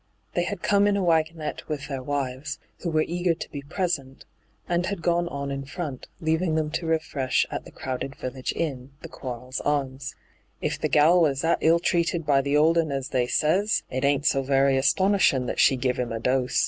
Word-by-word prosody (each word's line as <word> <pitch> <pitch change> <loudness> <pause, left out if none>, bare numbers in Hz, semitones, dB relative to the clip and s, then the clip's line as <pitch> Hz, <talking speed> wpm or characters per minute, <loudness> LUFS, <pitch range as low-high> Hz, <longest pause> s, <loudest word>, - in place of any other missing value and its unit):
They 175 - +1
had 195 0 -5
come 205 0 +4
in 205 -1 +2
a 195 - 0
wagonette 160 -2 0
with 150 -2 -4
their 135 -2 -4
wives, 140 +1 -3 0.2
who 175 - -3
were 155 -1 +2
eager 175 0 0
to - - -8
be 140 - -5
present, 145 -4 -3 0.4
and 175 +1 0
had 200 -5 -4
gone 175 0 +2
on 140 -3 -4
in 140 0 -3
front, 145 -1 -6
leaving 160 +1 +1
them 155 -1 0
to 165 +1 -3
refresh 155 -5 +1
at - - -4
the - - -12
crowded 130 +1 -5
village 130 0 -4
inn, 135 -4 -4
the - - -5
Quarles 125 -1 -6
Arms. 140 -1 -2 0.2
' - - -39
If - - -2
the - - 0
gal 165 +4 +5
was 140 -4 +2
that 165 +1 +2
ill 165 +1 +5
treated 170 -1 0
by 140 -2 +4
the 140 +2 +1
old 165 +3 +4
un 160 -3 0
as 135 -1 -3
they 125 -2 +1
says, 190 +11 +2
it 130 +1 -2
ain't 140 +1 +2
so 135 - +3
very 135 0 +3
astonishin' 145 0 +3
that - - -3
she 135 - +5
giv 125 -1 -1
'im 125 -2 -2
a 115 - -3
dose. 125 +2 +1
145 Hz, 210 wpm, -25 LUFS, 135-170 Hz, 0.4 s, gal